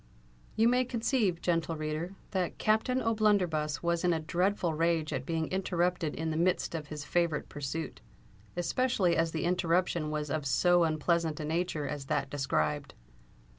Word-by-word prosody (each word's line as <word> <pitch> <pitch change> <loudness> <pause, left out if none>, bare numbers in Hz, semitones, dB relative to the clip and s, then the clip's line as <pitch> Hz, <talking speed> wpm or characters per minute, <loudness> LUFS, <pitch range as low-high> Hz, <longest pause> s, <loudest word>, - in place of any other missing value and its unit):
You 225 +1 +4
may 250 +1 +4
conceive, 230 -7 0
gentle 165 -1 0
reader, 155 +4 -3 0.2
that 185 -3 -1
Captain 220 +4 +1
O'Blunderbuss 190 -10 +1
was 170 0 +1
in 175 -1 +3
a 160 - 0
dreadful 175 +2 0
rage 165 -1 +1
at 130 - -3
being 165 -1 0
interrupted 180 -3 0
in 160 0 -2
the 155 - -2
midst 175 +1 +1
of 155 -3 -4
his 150 0 -6
favourite 170 -3 0
pursuit—especially 160 - -2
as 165 0 +1
the 160 - -2
interruption 175 -2 +1
was 150 -1 -3
of 150 -2 -1
so 175 +5 +4
unpleasant 160 0 0
a 155 - -3
nature 160 -2 -1
as 140 -2 -5
that 135 - -1
described. 145 0 -1
165 Hz, 155 wpm, -30 LUFS, 155-180 Hz, 0.2 s, You